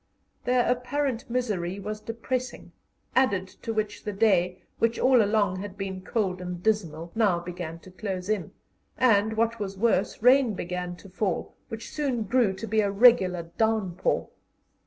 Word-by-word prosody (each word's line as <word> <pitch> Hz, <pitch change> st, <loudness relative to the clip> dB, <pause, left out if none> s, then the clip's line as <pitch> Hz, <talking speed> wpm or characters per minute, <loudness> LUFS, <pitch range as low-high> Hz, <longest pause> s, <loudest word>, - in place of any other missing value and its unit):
Their 250 Hz, 0 st, +3 dB
apparent 250 Hz, 0 st, -1 dB
misery 205 Hz, -7 st, -1 dB
was 210 Hz, +2 st, -5 dB
depressing, 240 Hz, +3 st, -4 dB, 0.4 s
added 200 Hz, -8 st, +2 dB
to 230 Hz, -, -3 dB
which 215 Hz, -1 st, -2 dB
the 210 Hz, -, -3 dB
day, 185 Hz, -3 st, +2 dB, 0.2 s
which 230 Hz, 0 st, +2 dB
all 255 Hz, -2 st, +5 dB
along 205 Hz, -3 st, +2 dB
had 200 Hz, 0 st, -7 dB
been 190 Hz, -1 st, -4 dB
cold 190 Hz, -2 st, -1 dB
and 180 Hz, -1 st, -6 dB
dismal, 170 Hz, -7 st, -1 dB
now 210 Hz, -6 st, +3 dB
began 175 Hz, -2 st, -6 dB
to 185 Hz, -, -14 dB
close 185 Hz, -1 st, -4 dB
in, 210 Hz, -4 st, -1 dB, 0.5 s
and, 220 Hz, -3 st, +3 dB
what 230 Hz, 0 st, +1 dB
was 195 Hz, -2 st, -4 dB
worse, 210 Hz, -2 st, +1 dB
rain 250 Hz, -3 st, +5 dB
began 180 Hz, 0 st, -4 dB
to 195 Hz, -, -14 dB
fall, 190 Hz, -1 st, -2 dB
which 225 Hz, 0 st, -7 dB
soon 270 Hz, -7 st, -1 dB
grew 230 Hz, 0 st, +2 dB
to 190 Hz, +4 st, -6 dB
be 220 Hz, 0 st, +2 dB
a 200 Hz, -, +1 dB
regular 195 Hz, -6 st, +4 dB
downpour. 215 Hz, -5 st, +1 dB
210 Hz, 155 wpm, -27 LUFS, 185-230 Hz, 0.5 s, all